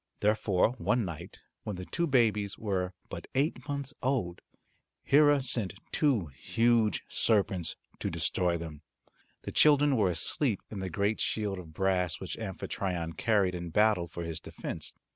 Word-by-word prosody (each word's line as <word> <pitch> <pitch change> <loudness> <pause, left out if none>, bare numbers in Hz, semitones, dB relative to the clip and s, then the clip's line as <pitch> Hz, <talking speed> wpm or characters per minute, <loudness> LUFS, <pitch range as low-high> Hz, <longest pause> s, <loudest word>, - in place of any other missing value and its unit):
Therefore 105 -1 +3
one 120 -3 +1
night, 85 -4 -7 0.2
when 105 - -4
the 90 0 -6
two 170 - -1
babies 105 -7 +2
were 95 -4 -2
but - - -7
eight 145 +2 0
months 140 0 -3
old, 125 -10 -1 0.6
Hera 145 -1 +5
sent 115 -6 -1 0.2
two 135 - +2
huge 115 - +2
serpents 95 -6 +1 0.2
to - - -2
destroy 90 -1 0
them. 80 -3 -8 0.6
The - - -5
children 145 -2 +5
were 105 -6 +3
asleep 100 - 0
in 105 - -5
the 95 -1 -3
great 100 +5 0
shield 105 -3 -1
of 80 -3 -11
brass 90 -2 +1
which - - -5
Amphitryon 85 -4 -3
carried 100 +1 +2
in 85 -1 -5
battle 105 -1 +3
for 85 0 -6
his 85 -1 -4
defence. - - -6
100 Hz, 150 wpm, -30 LUFS, 90-120 Hz, 0.6 s, Hera